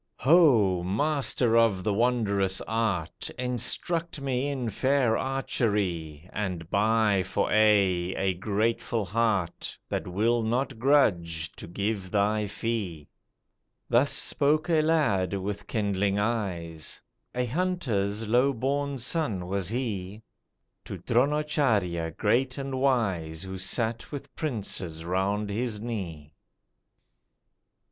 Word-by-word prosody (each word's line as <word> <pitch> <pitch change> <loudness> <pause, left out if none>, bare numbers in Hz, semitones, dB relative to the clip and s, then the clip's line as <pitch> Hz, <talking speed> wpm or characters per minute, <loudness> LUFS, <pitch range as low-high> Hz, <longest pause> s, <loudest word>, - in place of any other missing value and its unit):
"Ho! 125 - +5
Master 125 - +1
of 115 -5 +3
the 105 - +1
wondrous 100 -5 +1
art! 110 -8 -2
Instruct 155 +7 -2
me 135 -1 -1
in 130 -5 -2
fair 130 0 +2
archery, 100 - -1
And 90 -5 -3
buy 105 -1 +3
for 95 +2 -1
aye, 100 -4 +3
a 95 -1 +1
grateful 110 +3 -1
heart 100 -3 -1
That - - -3
will 110 +6 +1
not 120 +2 -1
grudge 85 - +2
to - - -10
give 100 +1 -3
thy 105 +1 +1
fee." 100 -9 -4 0.8
Thus 125 +4 +4
spoke 150 +4 +2
a 160 -2 +4
lad 140 - +1
with 100 +1 -4
kindling 100 -2 0
eyes, 95 -8 -2 0.4
A 125 0 0
hunter's 115 - -1
low 125 +5 +3
born 140 +3 -1
son 120 - 0
was 95 -1 -2
he, 110 -4 -4 0.6
To - - -6
Dronacharjya, 120 - +1
great 125 +5 +1
and 135 -1 -3
wise, 95 -12 0
Who 95 0 -6
sat 115 +4 -1
with 145 -2 -8
princes 95 - -3
round 100 +3 -1
his 110 0 -2
knee. 85 -10 -6
110 Hz, 110 wpm, -27 LUFS, 95-125 Hz, 0.8 s, Ho